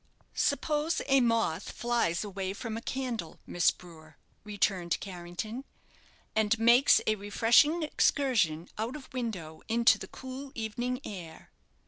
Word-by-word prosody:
"Suppose 305 +1 0
a 270 -1 +4
moth 225 -8 +1
flies 235 -8 0
away 195 -2 -4
from 220 +2 -5
a 225 - -4
candle, 240 -10 -4
Miss 175 -1 +3
Brewer," 160 -4 -10 0.3
returned 195 -4 0
Carrington, 190 +6 -6 0.7
"and 220 +1 +2
makes 235 +4 +6
a 215 - +3
refreshing 225 - +3
excursion 220 - +1
out 230 +5 -2
of 280 -4 -11
window 195 -11 -5
into 235 +1 +4
the - - -7
cool 265 +1 -8
evening 240 +3 -3
air! 175 -6 -9
220 Hz, 125 wpm, -30 LUFS, 185-250 Hz, 0.7 s, makes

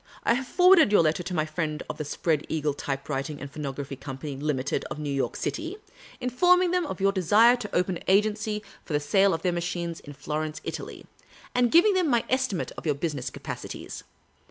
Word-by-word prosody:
I - - +4
have 260 +2 -2
forwarded 360 - +6
your 205 -5 +6
letter 155 +2 +1
to 180 +1 -5
my 155 -2 +1
friends 155 -1 -3
of - - -6
the 155 - -3
Spread 150 +1 0
Eagle 150 -2 0
Type 140 -1 -4
writing 145 +1 -3
and 145 - -8
Phonograph 140 -2 -5
Company, 135 +1 -6
Limited, 140 -1 -1
of - - -6
New 150 -2 -3
York 135 - -1
City, 330 +5 -3 0.4
in 250 -1 -2
forming 360 +6 +4
them 360 -3 +1
of - - -5
your 195 +1 +3
desire 205 +6 +5
to 220 -4 -6
open 180 0 +1
an - - -13
agency 210 +2 +1 0.2
for - - -6
the 145 - +3
sale 195 +7 +3
of 165 -2 -2
their 180 - +2
machines 170 -1 -3
in 145 - -11
Florence, 155 +2 -4
Italy, - - -6 0.5
and 245 -1 +2
giving 355 +5 +6
them 370 -3 +2
my 235 -3 +2
estimate 260 -8 0
of - - -14
your 150 - +2
business 140 -4 -3
capacities. - - -7
170 Hz, 205 wpm, -26 LUFS, 150-235 Hz, 0.5 s, forwarded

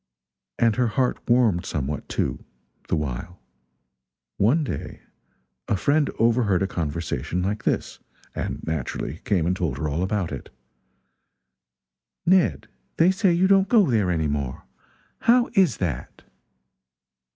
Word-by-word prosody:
And 115 -2 +2
her 125 -1 +3
heart 125 +3 0
warmed 115 -8 +3
somewhat, 75 0 -4
too, - - -2 0.4
the - - +1
while. 75 +4 -4 1.0
One 135 +11 +3
day 90 - -6 0.7
a 105 - +1
friend 145 +8 +2
overheard 115 -5 +2
a - - 0
conversation 85 0 -3
like 105 +3 -2
this: - - -1 0.3
and - - -4
naturally 80 +1 -3
came 90 -6 +1
and 90 +2 +1
told 85 -8 -2
her 75 - -2
all 75 +3 -2
about 95 -3 -1
it: 70 - -7 1.8
"Ned, 185 0 +3 0.3
they 175 +3 +5
say 190 0 +2
you 170 +2 +3
don't 195 0 +4
go 210 - +4
there 105 -5 +2
any 80 -3 0
more. 70 -3 -3 0.6
How 245 +1 +3
is 185 - +3
that?" 80 -9 -4
100 Hz, 130 wpm, -24 LUFS, -, 1.8 s, they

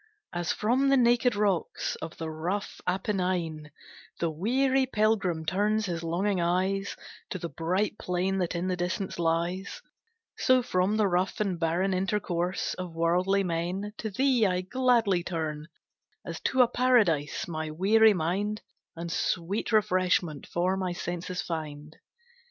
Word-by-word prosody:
As 175 -1 -1
from 255 +6 +2
the 275 - +5
naked 240 -1 +3
rocks 205 -4 0
Of 160 - -8
the 160 -1 -4
rough 175 +6 -3
Apennine, 180 -5 -1 0.5
The 170 -1 0
weary 260 - +1
pilgrim 210 -8 +1
turns 210 +5 +1
his 170 -3 -3
longing 180 +3 0
eyes 190 +3 0 0.3
To - - -3
the 170 -1 -5
bright 180 +8 -1
plain 185 +2 -1
that 175 -1 -1
in 175 +2 -1
the 185 - 0
distance 180 +1 -3
lies; 170 - -1 0.5
So 255 -1 +4
from 185 +1 +1
the 215 -2 +3
rough 180 0 0
and 195 -5 -1
barren 175 +4 +1
intercourse 185 -1 -1
Of 180 -2 -7
worldly 180 +4 +2
men, 180 +4 -2
to 220 - -3
thee 255 +2 +2
I 180 -1 0
gladly 225 -3 +2
turn, 155 -3 -4 0.6
As - - -5
to 260 -1 +5
a - - +2
Paradise, 215 - +2
my 160 -2 -4
weary 210 +7 +4
mind, 195 +6 -1 0.3
And 170 0 -5
sweet 180 +4 -1
refreshment 185 -7 +1
for 180 +2 0
my 185 -2 -2
senses 175 +2 -4
find. 155 -3 -6
185 Hz, 145 wpm, -28 LUFS, 170-210 Hz, 0.6 s, the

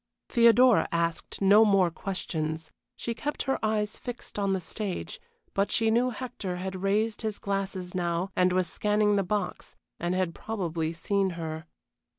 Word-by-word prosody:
Theodora 235 0 +5
asked 170 +2 -2
no 205 +3 +7
more 195 -5 +4
questions. 160 -4 -3 0.2
She 235 - -3
kept 295 +5 -3
her 270 - -1
eyes 215 -1 0
fixed 245 -3 -7
on 200 -1 +1
the 190 - 0
stage, 195 +1 -5 0.3
but 200 +1 +1
she 225 -1 +2
knew 240 +3 +3
Hector 235 -6 -5
had 185 +1 -5
raised 210 +3 +1
his 220 -2 -2
glasses 195 -2 -3
now 175 +1 -1
and 180 0 +3
was 185 0 +2
scanning 210 +2 +1
the 200 - +3
box, 205 +2 -3 0.2
and 175 +1 -1
had 185 -2 0
probably 170 -8 -3
seen 190 +3 0
her. 160 0 -5
195 Hz, 160 wpm, -28 LUFS, 180-215 Hz, 0.3 s, no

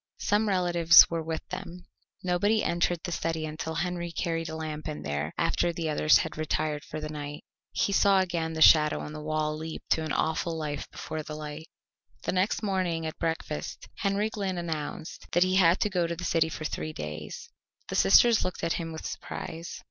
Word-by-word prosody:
Some 210 +1 +1
relatives 175 -3 +7
were 165 -1 -1
with 160 0 -4
them. 175 +1 -7 0.4
Nobody 200 +5 +2
entered 170 0 0
the 175 - -4
study 165 -1 -2
until 160 +1 -5
Henry 175 0 -2
carried 165 -1 -2
a 160 - -5
lamp 155 -1 -5
in 150 -1 -5
there 75 +1 -2
after 175 - +1
the 165 -1 -3
others 150 +1 +5
had 160 - -3
retired 155 -1 -1
for 155 - -6
the 155 - -4
night. 145 -1 -6 0.3
He 200 - 0
saw 195 -1 +5
again 170 -3 -1
the 160 0 +4
shadow 150 -1 +6
on 150 - -6
the 155 - -6
wall 155 0 -1
leap 160 +1 -6
to 160 - +3
an 155 - -3
awful 160 +2 0
life 150 -2 -4
before 155 - -5
the 155 0 -7
light. 155 +1 -7 0.6
The - - 0
next 185 +4 0
morning 185 -5 0
at 160 - -5
breakfast 160 -2 -3
Henry 200 +2 0
Glynn 195 -4 -2
announced 160 -2 -5
that 175 - +5
he 185 0 +2
had 175 -1 +5
to 210 - +2
go 175 -2 +1
to 170 - -3
the 175 - -7
city 165 -1 +2
for 155 -1 -6
three 155 +1 -3
days. 75 - -7 0.4
The - - -3
sisters 215 - +6
looked 185 - -4
at 165 - +1
him 165 0 -5
with 160 - -7
surprise. 165 +1 -6
165 Hz, 200 wpm, -28 LUFS, 155-175 Hz, 0.6 s, relatives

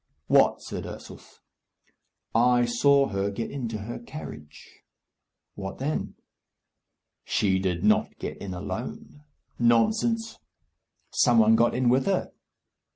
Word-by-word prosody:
"What?" - - +3
said - - -6
Ursus. - - -12 0.9
"I 120 +1 +4
saw 140 +3 +3
her 100 0 -1
get 100 +3 -5
into 120 -6 -4
her 105 +4 -6
carriage." 75 - -11 0.7
"What 95 -1 -7
then?" 145 +4 -3 1.1
"She 95 -3 +1
did 90 -3 -2
not - - +2
get - - -6
in 95 -2 -6
alone." 120 +9 -7 0.4
"Nonsense!" 220 - +2 0.7
"Some 120 - +3
one 110 0 +6
got 115 +1 +2
in 125 0 +1
with 130 +2 +3
her." 195 -2 0
120 Hz, 115 wpm, -26 LUFS, 100-135 Hz, 1.1 s, one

